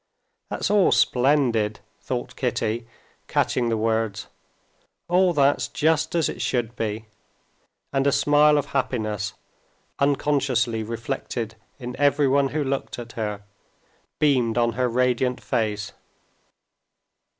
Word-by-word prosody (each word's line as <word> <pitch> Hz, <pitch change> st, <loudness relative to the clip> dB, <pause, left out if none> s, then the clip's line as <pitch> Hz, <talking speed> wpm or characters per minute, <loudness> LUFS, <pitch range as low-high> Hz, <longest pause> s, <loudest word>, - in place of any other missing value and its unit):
"That's -, -, -2 dB
all 205 Hz, -3 st, +4 dB
splendid," 125 Hz, -5 st, +2 dB, 0.2 s
thought -, -, -4 dB
Kitty, 115 Hz, +2 st, -2 dB, 0.4 s
catching 120 Hz, -2 st, +1 dB
the 115 Hz, -, 0 dB
words, 110 Hz, -2 st, -1 dB, 0.8 s
"all 180 Hz, +1 st, +4 dB
that's 145 Hz, -3 st, +2 dB
just 160 Hz, +2 st, +1 dB
as 165 Hz, -3 st, +2 dB
it -, -, -5 dB
should 120 Hz, -1 st, -1 dB
be," 110 Hz, 0 st, -3 dB, 0.9 s
and 135 Hz, 0 st, +2 dB
a -, -, +4 dB
smile 150 Hz, +1 st, +4 dB
of 145 Hz, -, 0 dB
happiness, 110 Hz, -6 st, -1 dB, 0.6 s
unconsciously 135 Hz, -5 st, +1 dB
reflected 115 Hz, 0 st, -4 dB, 0.2 s
in 125 Hz, -2 st, -6 dB
everyone 140 Hz, -1 st, +3 dB
who 150 Hz, +2 st, -2 dB
looked 135 Hz, 0 st, -3 dB
at 120 Hz, -1 st, -8 dB
her, 105 Hz, -3 st, -4 dB, 0.7 s
beamed 125 Hz, -6 st, +2 dB
on 120 Hz, -1 st, +3 dB
her 125 Hz, +1 st, 0 dB
radiant 125 Hz, +1 st, +1 dB
face. 105 Hz, -2 st, -2 dB
125 Hz, 115 wpm, -24 LUFS, 115-140 Hz, 0.9 s, all